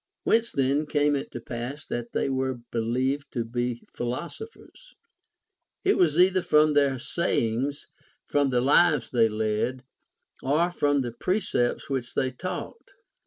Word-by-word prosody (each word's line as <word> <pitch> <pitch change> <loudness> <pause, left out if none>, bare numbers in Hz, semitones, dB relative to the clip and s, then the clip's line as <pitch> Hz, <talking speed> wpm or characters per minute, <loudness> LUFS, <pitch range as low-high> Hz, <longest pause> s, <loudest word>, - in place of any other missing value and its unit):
\Vhence 230 +1 +3
then 140 +3 +1
came 145 -1 +2
it 140 - -3
to - - -6
pass 120 +5 -6
that 120 0 -4
they - - 0
Avere 130 -2 -2
belicA^ed 125 +5 0
to 120 -3 -1
be 120 0 -3
philosophers 440 - -7 0.9
1 390 - +4
It - - -2
was 160 -4 +3
either 185 +1 +5
from 150 -2 +4
their 140 -2 +3
sayings, 135 -2 -1 0.4
from 145 -1 +1
the 125 -2 +2
lives 145 0 +4
they 115 -3 +4
led, 110 +4 -1 0.6
or 155 +6 +1
from 145 -4 +1
the 120 -2 -3
precepts 125 - -1
which 130 -3 -3
they 130 - +1
taught. 185 - -6
135 Hz, 145 wpm, -26 LUFS, 120-150 Hz, 0.9 s, either